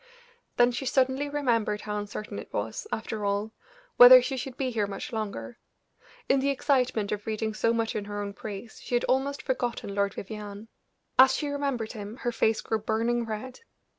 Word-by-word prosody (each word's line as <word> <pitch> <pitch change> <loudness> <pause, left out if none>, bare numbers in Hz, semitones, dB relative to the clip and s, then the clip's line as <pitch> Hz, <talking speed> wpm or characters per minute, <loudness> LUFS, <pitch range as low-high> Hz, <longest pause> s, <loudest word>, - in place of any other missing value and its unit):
Then 245 0 +5
she 255 +2 -4
suddenly 265 +2 +1
remembered 230 -7 0
how 210 0 -3
uncertain 205 +1 -6
it - - -10
was, - - -3
after 220 -1 -3
all, 200 +2 -1 0.5
whether 250 +1 +11
she 265 +2 -2
should 255 0 -6
be 260 -2 -1
here 215 -3 0
much 200 +3 -6
longer; 220 +2 -5 0.7
in 270 - +4
the 275 +1 +1
excitement 255 -6 +1
of 210 0 -4
reading 220 0 -2
so 230 +2 +1
much 230 -1 -1
in 205 - -2
her 205 0 -5
own 200 -1 -4
praise, 210 +2 -8
she 245 - -2
had 240 - +2
almost 275 +2 0
forgotten 245 -6 -2
Lord 200 0 0
Vivianne. 210 +1 -7 0.5
As 265 0 +8
she 295 - -2
remembered 275 -6 -2
him 210 0 -7
her 240 -2 -2
face 220 -1 +1
grew 220 - -1
burning 230 +2 0
red. 225 +4 -6
230 Hz, 185 wpm, -28 LUFS, 210-255 Hz, 0.7 s, whether